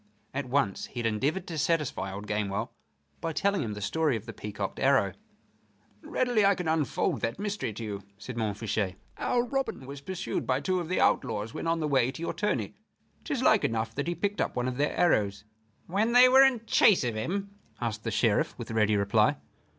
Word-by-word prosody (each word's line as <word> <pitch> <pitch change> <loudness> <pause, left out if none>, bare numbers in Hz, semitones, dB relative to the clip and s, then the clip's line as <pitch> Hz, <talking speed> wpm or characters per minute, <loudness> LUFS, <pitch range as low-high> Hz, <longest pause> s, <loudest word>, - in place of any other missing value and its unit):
At 135 -1 -3
once 125 -7 0
he - - -14
had 120 - -2
endeavored 140 - 0
to 165 -3 -4
satisfy 150 - 0
old 100 +2 -7
Gamewell 105 -1 -2 0.5
by 165 - -3
telling 200 +2 +1
him 110 -6 -3
the 105 - -7
story 155 +3 +1
of 110 -1 -5
the 115 - -7
peacocked 105 -2 -5
arrow. 135 -7 +3 0.9
"Readily 245 -4 +1
can 180 -2 -4
I 160 - +3
unfold 150 -6 0
that 115 - -2
mystery 205 - -3
to 115 - -7
you," 100 -2 -4 0.2
said 115 +5 -8
Montfichet. 105 -3 -1 0.2
"Our 240 -1 +1
Robin 265 - -3
was 140 +1 -8
pursued 185 +4 -4
by 130 0 +2
two 185 +6 0
of 170 -2 -5
the 185 - 0
outlaws 105 +2 +1
when - - -4
on 165 0 +1
the 155 - 0
way 130 -4 +3
to 160 - -8
your - - -2
tourney. 130 - -1 0.5
'Tis - - -1
like - - +5
enough 115 0 -1
that 140 +5 -3
he 175 - -1
picked 205 +4 -1
up - - -1
one 125 0 0
of 125 -1 -3
their 145 +1 0
arrows." 105 - +2 0.4
"When 210 +6 0
they 250 +1 +9
were 260 +1 +7
in 250 -4 +2
chase 205 -7 +5
of 120 -2 -1
him?" 195 - -3 0.3
asked 115 -2 -3
the 115 - -2
Sheriff, 110 -1 +1
with 115 -2 -7
ready 110 -1 +2
reply. 100 0 +3
130 Hz, 205 wpm, -28 LUFS, 110-175 Hz, 0.9 s, they